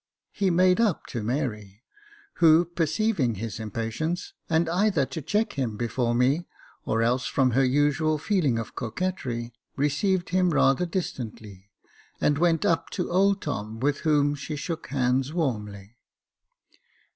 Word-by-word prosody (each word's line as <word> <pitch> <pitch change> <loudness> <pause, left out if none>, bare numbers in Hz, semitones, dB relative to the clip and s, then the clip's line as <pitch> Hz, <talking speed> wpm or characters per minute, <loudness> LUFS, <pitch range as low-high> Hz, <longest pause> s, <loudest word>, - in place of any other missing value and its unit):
He 200 -2 0
made 185 +3 +4
up 210 -8 +1
to 120 - -4
Mary, 110 -3 -3 0.5
who, 165 0 +6
perceiving 170 - 0
his 110 +1 -5
impatience, 115 - -3 0.2
and 165 0 +2
either 180 -3 +2
to 160 - -6
check 210 +9 0
him 120 -7 -2
before 120 +1 -1
me, 135 +8 +2 0.4
or 115 +1 +1
else 125 +2 +1
from 130 -2 +2
her 135 +3 +3
usual 145 +4 +2
feeling 150 - +1
of 115 - -5
coquetry, 120 - -3 0.2
received 175 +6 0
him 185 0 +2
rather 150 +1 +3
distantly, 110 - -6 0.5
and 145 0 +2
went 170 -2 +2
up 165 - +1
to - - -3
old 195 +2 +2
Tom, 110 -6 -4
with 140 +3 0
whom 145 -2 +2
she 145 +2 -5
shook 160 +2 -5
hands 130 +1 0
warmly. 105 - -3
145 Hz, 140 wpm, -26 LUFS, 120-170 Hz, 0.5 s, who